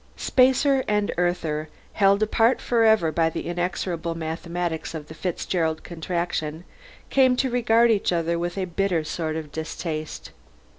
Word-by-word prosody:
Spacer 265 Hz, +1 st, +3 dB
and 210 Hz, -1 st, +1 dB
Earther, 165 Hz, -3 st, -1 dB, 0.2 s
held 200 Hz, +1 st, +4 dB
apart 225 Hz, +3 st, +3 dB
forever 220 Hz, -8 st, +3 dB
by 160 Hz, +1 st, +2 dB
the -, -, -5 dB
inexorable 175 Hz, -1 st, -2 dB
mathematics 165 Hz, +1 st, -4 dB
of 150 Hz, -2 st, -7 dB
the -, -, -8 dB
Fitzgerald 160 Hz, -1 st, -2 dB
Contraction, 170 Hz, -2 st, -3 dB, 0.5 s
came 260 Hz, -2 st, +4 dB
to 260 Hz, 0 st, 0 dB
regard 235 Hz, -1 st, +4 dB
each 205 Hz, -4 st, +1 dB
other 170 Hz, -1 st, 0 dB
with 175 Hz, +2 st, -3 dB
a 190 Hz, -, 0 dB
bitter 180 Hz, -2 st, 0 dB
sort 155 Hz, 0 st, -3 dB
of 155 Hz, -2 st, -5 dB
distaste. 155 Hz, 0 st, -5 dB
175 Hz, 140 wpm, -24 LUFS, 160-210 Hz, 0.5 s, held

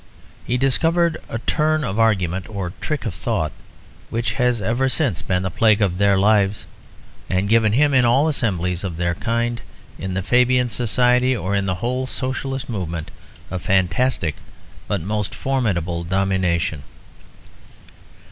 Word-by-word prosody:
He 125 Hz, -, +1 dB
discovered 165 Hz, +6 st, +2 dB
a -, -, -3 dB
turn 155 Hz, +6 st, +1 dB
of 110 Hz, -4 st, -2 dB
argument 95 Hz, -5 st, +1 dB
or 95 Hz, -4 st, -4 dB
trick 150 Hz, -4 st, -3 dB
of 110 Hz, -, -2 dB
thought 85 Hz, -2 st, -2 dB, 0.6 s
which 115 Hz, -1 st, -1 dB
has 125 Hz, 0 st, +1 dB
ever 120 Hz, +6 st, 0 dB
since 130 Hz, -, 0 dB
been 90 Hz, -1 st, -1 dB
the 95 Hz, -, -2 dB
plague 110 Hz, -2 st, +3 dB
of 95 Hz, -3 st, 0 dB
their 100 Hz, -1 st, +4 dB
lives, 100 Hz, 0 st, +2 dB, 0.6 s
and 95 Hz, +1 st, +1 dB
given 110 Hz, -1 st, +3 dB
him 145 Hz, +4 st, +3 dB
in 130 Hz, -1 st, +5 dB
all 130 Hz, +6 st, +4 dB
assemblies 90 Hz, -, -1 dB
of 90 Hz, -4 st, -4 dB
their 85 Hz, 0 st, 0 dB
kind, 115 Hz, +4 st, -1 dB, 0.4 s
in 95 Hz, -1 st, -4 dB
the 95 Hz, -, -1 dB
Fabian 125 Hz, +3 st, +3 dB
Society 125 Hz, +2 st, +2 dB
or 100 Hz, -1 st, -3 dB
in 100 Hz, -1 st, 0 dB
the 95 Hz, -, 0 dB
whole 130 Hz, +1 st, -1 dB
Socialist 135 Hz, +1 st, -4 dB
movement, 85 Hz, -8 st, -4 dB, 0.4 s
a 95 Hz, -, -2 dB
fantastic 95 Hz, -, +1 dB, 0.5 s
but 100 Hz, -4 st, -1 dB
most 105 Hz, +3 st, -3 dB
formidable 90 Hz, -11 st, -1 dB
domination. 90 Hz, -3 st, 0 dB
110 Hz, 145 wpm, -21 LUFS, 95-125 Hz, 0.6 s, in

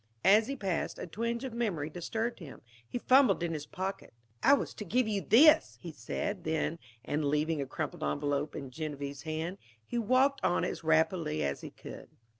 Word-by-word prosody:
As 210 Hz, +4 st, +6 dB
he 275 Hz, -, -3 dB
passed, 195 Hz, -9 st, -2 dB
a -, -, -5 dB
twinge 230 Hz, +7 st, -3 dB
of 260 Hz, -3 st, -5 dB
memory 200 Hz, -11 st, -1 dB
disturbed 220 Hz, +9 st, -3 dB
him. 160 Hz, -6 st, -11 dB, 0.3 s
He -, -, -3 dB
fumbled 250 Hz, -7 st, +4 dB
in 170 Hz, -1 st, -1 dB
his 150 Hz, -1 st, -5 dB
pockets. 190 Hz, -8 st, -5 dB, 0.3 s
"I -, -, +6 dB
was -, -, -4 dB
to -, -, -7 dB
give 230 Hz, +5 st, +1 dB
you 205 Hz, -2 st, 0 dB
this," 300 Hz, -, +6 dB
he 170 Hz, -, -7 dB
said 190 Hz, +4 st, -4 dB
then; 160 Hz, +1 st, -1 dB, 0.3 s
and 150 Hz, +1 st, -1 dB
leaving 150 Hz, +1 st, +1 dB
a 135 Hz, -, -4 dB
crumpled 150 Hz, +2 st, -4 dB
envelope 145 Hz, 0 st, -1 dB
in 135 Hz, -2 st, -6 dB
Genevieve's 140 Hz, -2 st, -5 dB
hand, 160 Hz, +5 st, -4 dB, 0.3 s
he 240 Hz, -, -2 dB
walked 255 Hz, +5 st, +2 dB
on 175 Hz, -, +2 dB
as -, -, -4 dB
rapidly 160 Hz, -, +2 dB
as 70 Hz, -1 st, -2 dB
he -, -, -7 dB
could. -, -, -11 dB
175 Hz, 190 wpm, -31 LUFS, 150-225 Hz, 0.3 s, As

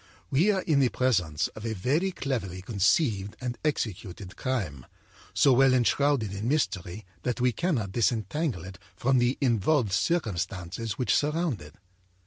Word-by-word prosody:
We 165 Hz, +10 st, +3 dB
are 195 Hz, -3 st, +1 dB
in 150 Hz, -4 st, +2 dB
the 130 Hz, -3 st, +4 dB
presence 90 Hz, -15 st, +1 dB
of 110 Hz, -, -11 dB
a 115 Hz, -1 st, -2 dB
very 150 Hz, -, +1 dB
cleverly 110 Hz, -, -3 dB
conceived 105 Hz, -, +1 dB
and 125 Hz, -1 st, -3 dB
executed 105 Hz, -, -3 dB
crime, 95 Hz, -, -3 dB, 0.4 s
so 140 Hz, -, +4 dB
well 130 Hz, +1 st, +5 dB
enshrouded 125 Hz, -3 st, +2 dB
in 100 Hz, +3 st, -3 dB
mystery 105 Hz, -, -1 dB, 0.2 s
that 125 Hz, +3 st, -2 dB
we 125 Hz, 0 st, +3 dB
cannot 120 Hz, -, -1 dB
disentangle 115 Hz, -, 0 dB
it 95 Hz, -1 st, -10 dB, 0.2 s
from 130 Hz, 0 st, +2 dB
the 120 Hz, +2 st, +1 dB
involved 120 Hz, -1 st, +2 dB
circumstances 95 Hz, -, -1 dB
which 120 Hz, -1 st, 0 dB
surround 150 Hz, -, 0 dB
it. 75 Hz, +1 st, -12 dB
120 Hz, 145 wpm, -27 LUFS, 95-140 Hz, 0.4 s, well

